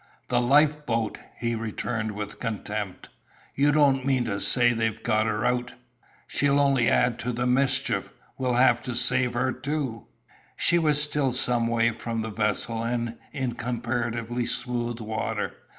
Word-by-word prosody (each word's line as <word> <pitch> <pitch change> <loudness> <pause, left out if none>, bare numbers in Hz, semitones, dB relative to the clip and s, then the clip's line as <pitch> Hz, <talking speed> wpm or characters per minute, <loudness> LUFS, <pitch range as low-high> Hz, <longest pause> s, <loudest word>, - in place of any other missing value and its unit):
"The 120 -1 +2
life 150 +4 +3
boat!" 115 -2 -1 0.2
he 120 -1 -1
returned 110 0 -3
with 105 0 -6
contempt. 105 -4 -4 0.4
"You 145 +2 +3
don't 140 -3 +3
mean 130 -2 +1
to 100 -3 -2
say 120 -1 +4
they've 115 -1 -2
got 110 -1 +2
her 105 0 -1
out! 125 0 -1 0.5
She'll 145 0 +1
only 135 -4 +3
add 125 -1 +2
to 120 +4 -2
the 120 +1 -2
mischief. 130 +2 +1 0.2
We'll 125 -2 -1
have 125 -1 +4
to 125 - -4
save 125 0 +2
her 130 +2 +1
too." 130 -4 -4 0.5
She 175 - +4
was 150 -3 +3
still 150 -3 +2
some 120 -2 +2
way 115 0 +2
from 115 -1 -4
the 110 - -5
vessel, 110 +2 -1
and 115 0 -2
in 130 -5 -2
comparatively 120 0 -2
smooth 120 -1 -2
water. 110 0 -3
120 Hz, 155 wpm, -26 LUFS, 115-130 Hz, 0.5 s, say